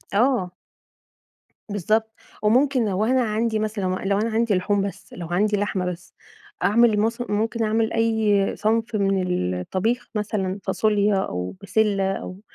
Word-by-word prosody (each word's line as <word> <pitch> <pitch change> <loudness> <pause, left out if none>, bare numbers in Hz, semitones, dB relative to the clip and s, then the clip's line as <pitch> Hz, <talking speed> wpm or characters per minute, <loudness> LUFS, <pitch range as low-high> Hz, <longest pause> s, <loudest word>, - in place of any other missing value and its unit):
آه. 210 -7 +1 1.1
بالضبط، 220 +3 0 0.3
وممكن 255 +3 +3
لو 195 +2 0
أنا 255 +2 +2
عندي 220 0 0
مثلًا 215 -2 -2
لو 195 +2 0
أنا 225 +2 0
عندي 225 -1 +1
لحوم 200 +2 +1
بس، - - -13
لو 175 -2 -7
عندي 205 +4 +2
لحمة 200 -2 -1
بس، 175 +1 -13 0.5
أعمل 220 0 +4
مث 230 +3 0
ممكن 225 +2 0
أعمل 220 +1 +1
أي 220 -3 +2
صنف 225 +2 0
من 180 - 0
الطبيخ 225 - -1
مثلًا، 205 -2 -2
فاصوليا 210 -1 +2
أو 90 - -3
بسلة 200 -3 +1
أو 185 0 -6
210 Hz, 140 wpm, -23 LUFS, 195-225 Hz, 1.1 s, أعمل